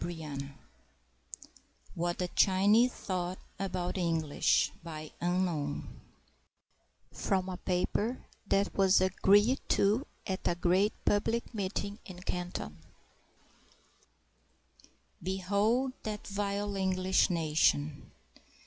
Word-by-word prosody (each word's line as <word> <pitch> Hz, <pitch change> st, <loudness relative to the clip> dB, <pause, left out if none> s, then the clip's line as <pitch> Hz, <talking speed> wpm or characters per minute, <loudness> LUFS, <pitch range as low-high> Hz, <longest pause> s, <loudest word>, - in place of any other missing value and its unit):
] -, -, -2 dB, 1.9 s
WHAT 175 Hz, +1 st, -1 dB
THE 180 Hz, -, -1 dB
CHINESE 205 Hz, +8 st, +4 dB
THOUGHT 180 Hz, -3 st, -3 dB, 0.2 s
ABOUT 180 Hz, -2 st, -2 dB
THE 190 Hz, -, -2 dB
ENGLISH 165 Hz, -4 st, +2 dB, 2.4 s
(From 190 Hz, -1 st, 0 dB
a 185 Hz, -, -4 dB
paper 200 Hz, +7 st, -1 dB, 0.2 s
that 200 Hz, 0 st, +1 dB
was 195 Hz, -1 st, +5 dB
agreed 205 Hz, +6 st, +4 dB
to 215 Hz, +8 st, +2 dB, 0.2 s
at 190 Hz, -1 st, -2 dB
a 175 Hz, -, +1 dB
great 185 Hz, +4 st, +2 dB
public 225 Hz, +4 st, +1 dB
meeting 200 Hz, 0 st, -3 dB
in 180 Hz, -2 st, -9 dB
Canton) 175 Hz, -, -4 dB, 2.4 s
Behold 200 Hz, +8 st, +1 dB
that 210 Hz, -1 st, -5 dB
vile 200 Hz, 0 st, -2 dB
English 190 Hz, -1 st, +2 dB
nation! 150 Hz, -, +1 dB
190 Hz, 85 wpm, -31 LUFS, 180-205 Hz, 2.4 s, was